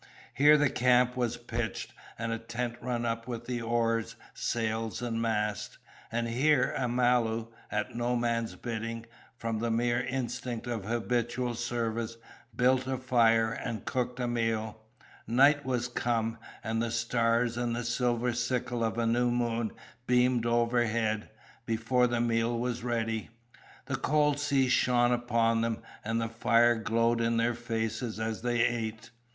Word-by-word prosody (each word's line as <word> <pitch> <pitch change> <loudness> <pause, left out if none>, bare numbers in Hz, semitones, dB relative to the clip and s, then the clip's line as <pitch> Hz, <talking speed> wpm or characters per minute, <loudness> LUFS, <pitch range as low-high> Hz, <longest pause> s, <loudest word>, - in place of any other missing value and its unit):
Here 150 +3 +6
the 145 -3 +2
camp 125 0 +3
was 120 -2 -1
pitched 120 -1 -4 0.2
and 115 0 -3
a 115 - -2
tent 115 +1 -4
run 120 -1 -2
up 115 0 -2
with 120 -2 -5
the 125 -1 -3
oars, 115 -1 0 0.2
sails, 115 -1 -2
and 115 -2 -2
mast. 105 -2 -1 0.3
And 115 +1 -1
here 130 +4 +2
Amalu, 120 -2 +1 0.2
at 105 0 -2
no 120 +1 0
man's 115 -1 -1
bidding, 115 0 -4 0.3
from 115 -2 -2
the 115 +1 -1
mere 120 +1 +1
instinct 125 -2 -3
of 115 -5 -3
habitual 120 +2 -1
service, 115 -1 -2 0.4
built 130 +1 +3
a 130 0 -1
fire 115 -3 +3
and 115 -2 -5
cooked 125 -1 -2
a 125 - 0
meal. 110 -2 -1 0.5
Night 140 +4 +4
was 125 -2 0
come, 115 -2 -1 0.2
and 115 0 -1
the 115 - -1
stars 115 0 +1
and 120 -1 -1
the 120 - -2
silver 120 0 0
sickle 125 -1 -1
of 115 0 -1
new 120 +1 +2
moon 120 -2 0 0.4
beamed 125 -1 +3
overhead, 115 -2 +1 0.4
before 115 +2 +2
the 120 -1 -1
meal 115 0 +1
was 120 0 -2
ready. 115 -2 -1 0.6
The - - -2
cold 150 -1 +2
sea 140 -3 +2
shone 125 -1 +3
about 115 -2 +2
them, 115 -1 -2 0.2
and 115 +2 -1
the 115 - -1
fire 115 +1 +4
glowed 115 +1 +1
in 115 0 +1
their 115 +1 +2
faces, 115 -1 -3
as 110 -1 -2
they 120 -1 +1
ate. 115 -2 -3
120 Hz, 150 wpm, -30 LUFS, 115-125 Hz, 0.6 s, Here